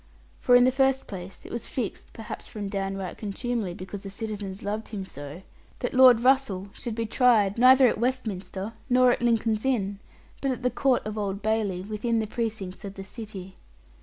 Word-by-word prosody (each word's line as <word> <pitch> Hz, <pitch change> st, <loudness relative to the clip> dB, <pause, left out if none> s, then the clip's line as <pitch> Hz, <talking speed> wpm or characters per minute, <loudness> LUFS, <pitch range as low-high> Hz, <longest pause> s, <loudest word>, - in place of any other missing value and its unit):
For 245 Hz, -, +5 dB
in 245 Hz, -, +7 dB
the 255 Hz, -, +5 dB
first 265 Hz, 0 st, +2 dB
place 190 Hz, -1 st, -8 dB
it -, -, -9 dB
was 235 Hz, -, -4 dB
fixed 235 Hz, -7 st, -4 dB
(perhaps 220 Hz, -1 st, -7 dB
from 205 Hz, -2 st, -5 dB
down 195 Hz, -1 st, -2 dB
right 185 Hz, -3 st, -5 dB
contumely, 215 Hz, -2 st, -3 dB
because 190 Hz, +2 st, -7 dB
the 195 Hz, -, -7 dB
citizens 200 Hz, -2 st, -5 dB
loved 210 Hz, +2 st, -3 dB
him 200 Hz, -3 st, -5 dB
so) 145 Hz, +2 st, -9 dB, 0.3 s
that 245 Hz, -, -3 dB
Lord 255 Hz, -2 st, +8 dB
Russell 245 Hz, -7 st, +2 dB
should 235 Hz, -3 st, -5 dB
be 230 Hz, 0 st, -1 dB
tried 220 Hz, -3 st, +3 dB
neither 260 Hz, +1 st, +8 dB
at 225 Hz, -, 0 dB
Westminster 215 Hz, -5 st, -2 dB, 0.2 s
nor 250 Hz, 0 st, +5 dB
at -, -, -1 dB
Lincoln's 225 Hz, -2 st, +1 dB
Inn, 205 Hz, -7 st, 0 dB, 0.4 s
but 275 Hz, -, 0 dB
at 255 Hz, -1 st, -3 dB
the 250 Hz, -, +2 dB
Court 265 Hz, -5 st, +1 dB
of 215 Hz, 0 st, -4 dB
Old 200 Hz, -1 st, -3 dB
Bailey, 210 Hz, -4 st, 0 dB
within 215 Hz, +3 st, -1 dB
the 220 Hz, -, +1 dB
precincts 215 Hz, -4 st, -4 dB
of 200 Hz, -1 st, -7 dB
the 195 Hz, -, -7 dB
city. 195 Hz, -3 st, -8 dB
215 Hz, 195 wpm, -26 LUFS, 195-245 Hz, 0.4 s, Lord